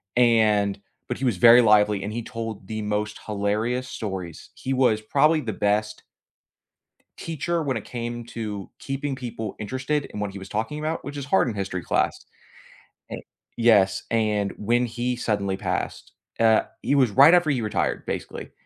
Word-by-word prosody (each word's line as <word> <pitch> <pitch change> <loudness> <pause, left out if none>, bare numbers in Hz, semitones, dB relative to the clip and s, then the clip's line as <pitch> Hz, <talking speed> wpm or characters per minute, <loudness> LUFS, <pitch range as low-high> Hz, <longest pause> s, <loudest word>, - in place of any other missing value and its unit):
and 110 -4 +3 0.3
but 125 - -3
he 135 - -2
was 120 -7 +1
very 115 +5 +8
lively, 105 -3 +4
and 105 +2 -4
he 120 - -3
told 115 -4 -6
the 110 0 -4
most 105 0 -2
hilarious 110 +5 -1
stories. 95 -8 -6
He 135 - -4
was 125 -5 +2
probably 150 +8 +3
the 115 - -3
best 105 +1 -1 1.1
teacher, 165 +1 -2
when 135 -5 -1
it 110 - -7
came 120 -1 -5
to 105 -4 -6
keeping 135 0 -3
people 120 -4 -6
interested 130 +7 -2
in - - -8
what 105 -1 -2
he 100 - -8
was 95 0 -10
talking 115 +9 -3
about, 155 +2 -3
which 145 +1 -6
is 140 -2 -5
hard 145 0 +3
in 120 - -2
History 95 -3 -4
class. - - 0 0.9
E - - -4 0.4
yes, 100 -5 +4
and 105 -3 +1
when 120 +3 +1
he 120 +1 -2
suddenly 100 -5 -1
passed, - - -4 0.3
uh, 110 -1 +5 0.2
he - - +1
was 135 -4 +4
right 140 - +7
after 175 -3 +4
he 135 -4 +1
retired, 105 - -1
basically, - - -5
115 Hz, 170 wpm, -24 LUFS, 105-130 Hz, 1.1 s, very